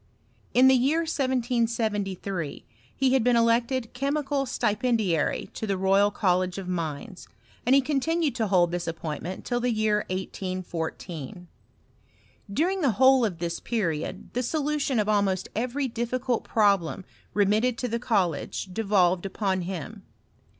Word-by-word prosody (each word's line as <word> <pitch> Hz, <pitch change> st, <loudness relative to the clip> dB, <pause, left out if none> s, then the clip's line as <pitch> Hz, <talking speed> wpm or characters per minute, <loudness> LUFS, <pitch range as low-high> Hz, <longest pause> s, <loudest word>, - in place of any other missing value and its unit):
In 255 Hz, +2 st, +7 dB
the 265 Hz, -, +7 dB
year 275 Hz, +6 st, +3 dB
1773 230 Hz, -, -1 dB, 0.3 s
he 265 Hz, -1 st, +2 dB
had 265 Hz, -3 st, +3 dB
been 245 Hz, 0 st, +3 dB
elected 235 Hz, +1 st, +1 dB
chemical 280 Hz, +1 st, -1 dB
stipendiary 215 Hz, -, 0 dB
to 220 Hz, -, -4 dB
the 195 Hz, -2 st, 0 dB
Royal 195 Hz, +2 st, +4 dB
College 185 Hz, -3 st, 0 dB
of 195 Hz, -2 st, -5 dB
Mines, 170 Hz, +2 st, -4 dB, 0.4 s
and 260 Hz, -, +6 dB
he 275 Hz, -, +5 dB
€K)ntinaed 305 Hz, +2 st, 0 dB
to 225 Hz, -3 st, -1 dB
hold 175 Hz, -3 st, +3 dB
this 175 Hz, -1 st, -3 dB
appointment 165 Hz, +2 st, -5 dB
till 245 Hz, -, 0 dB
the 245 Hz, +1 st, 0 dB
year 215 Hz, -1 st, +2 dB
1814. 180 Hz, -3 st, -5 dB, 1.0 s
During 360 Hz, -, 0 dB
the 275 Hz, -7 st, +2 dB
whole 260 Hz, +3 st, +5 dB
of 200 Hz, -7 st, -1 dB
this 170 Hz, 0 st, -3 dB
period 170 Hz, -10 st, -3 dB
the 250 Hz, -, 0 dB
solution 290 Hz, 0 st, -1 dB
of 210 Hz, -1 st, +1 dB
almost 200 Hz, -3 st, +1 dB
every 255 Hz, +5 st, -1 dB
difficult 240 Hz, +1 st, -2 dB
problem 195 Hz, -4 st, +1 dB, 0.3 s
remitted 215 Hz, +4 st, +2 dB
to 250 Hz, -, -2 dB
the 235 Hz, 0 st, -2 dB
college 190 Hz, -, -1 dB
devolved 190 Hz, -3 st, +2 dB
upon 190 Hz, -1 st, -1 dB
him. 190 Hz, +4 st, -6 dB
215 Hz, 135 wpm, -26 LUFS, 185-250 Hz, 1.0 s, In